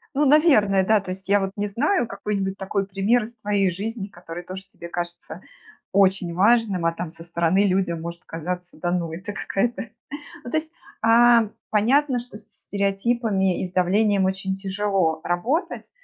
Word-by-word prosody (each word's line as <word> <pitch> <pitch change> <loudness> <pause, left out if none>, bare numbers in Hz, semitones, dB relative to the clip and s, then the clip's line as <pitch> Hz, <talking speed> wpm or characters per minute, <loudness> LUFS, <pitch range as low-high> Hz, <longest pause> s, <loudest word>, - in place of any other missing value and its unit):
Ну, 290 +2 +3
наверное, 265 - +5
да. 215 +1 +4
То 185 -2 -8
есть 190 +1 -7
я 205 +1 +5
вот 195 0 -2
не 205 - -1
знаю 245 - +1
какой-нибудь 195 -1 -3
такой 195 0 -2
пример 200 +5 +1
из 230 +2 -8
твоей 200 -2 +1
жизни, 205 +2 -5
который 175 -2 -9
тоже 190 +2 -8
тебе 170 -2 -11
кажется 175 0 -6 0.5
очень 190 -3 +2
важным, 200 -3 +3
а 165 - +2
там 170 -1 -5
со 165 0 -12
стороны 170 +3 +1
людям 185 -3 0
может 170 +1 -7
казаться: 175 +2 -6
"Да 175 - -1
ну, 170 -2 -1
это 190 +5 -6
какая-то". 230 +3 -2 0.5
Ну 240 - -6
то 315 - 0
есть, 315 +1 -2 0.3
а, 230 0 +6 0.2
понятно, 250 +5 +3
что 240 -4 -11
со 215 0 -18
стереотипами 200 -1 0
и - - -1
с 180 - -7
давлением 195 +2 +2
очень 190 0 -1
тяжело 195 -4 0
работать, 235 - -1
195 Hz, 170 wpm, -23 LUFS, 180-220 Hz, 0.5 s, а